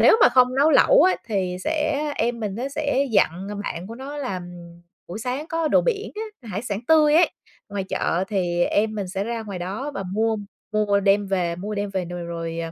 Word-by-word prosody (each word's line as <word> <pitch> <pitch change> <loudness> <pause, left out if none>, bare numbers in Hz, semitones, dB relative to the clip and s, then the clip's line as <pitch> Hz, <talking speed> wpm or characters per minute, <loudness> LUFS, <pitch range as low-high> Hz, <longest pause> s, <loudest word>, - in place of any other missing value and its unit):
nếu - - +7
mà - - +9
không 255 0 +4
nấu 295 +3 +5
lẩu - - +6
á 370 - +5
thì 190 -5 -1
sẽ 310 -2 0 0.2
em 235 0 0
mình 205 -3 -3
nó 255 +3 -3
sẽ 280 -1 0
dặn, 190 -2 +2
ờ, - - -4
bạn 185 -3 -5
của 230 - -7
nó 280 +3 -7
là 195 -10 -3 0.7
buổi 180 - -6
sáng 255 +6 -3
có 330 -1 0
đồ - - +5
biển 435 -4 -2 0.3
á, 230 - -11
hải 205 +3 -3
sản 205 -3 -3
tươi 305 -2 +5
ấy, 345 - +5 0.4
ngoài 200 -1 -3
chợ 185 -1 -1
thì 175 -4 +1
em 215 +1 +1
mình 195 -3 -3
sẽ 195 +2 -3
ra 230 0 -3
ngoài 200 -4 -6
đó 200 +11 -4
và 195 - -3
mua 220 +2 +1 0.4
mua 205 -1 +2
đem 200 +1 +3
về 175 -3 0
mua 210 +4 -5
đem 205 0 -2
về 190 -2 -2
nồi 175 0 -6
rồi 165 -1 -5
210 Hz, 220 wpm, -23 LUFS, 190-275 Hz, 0.7 s, mà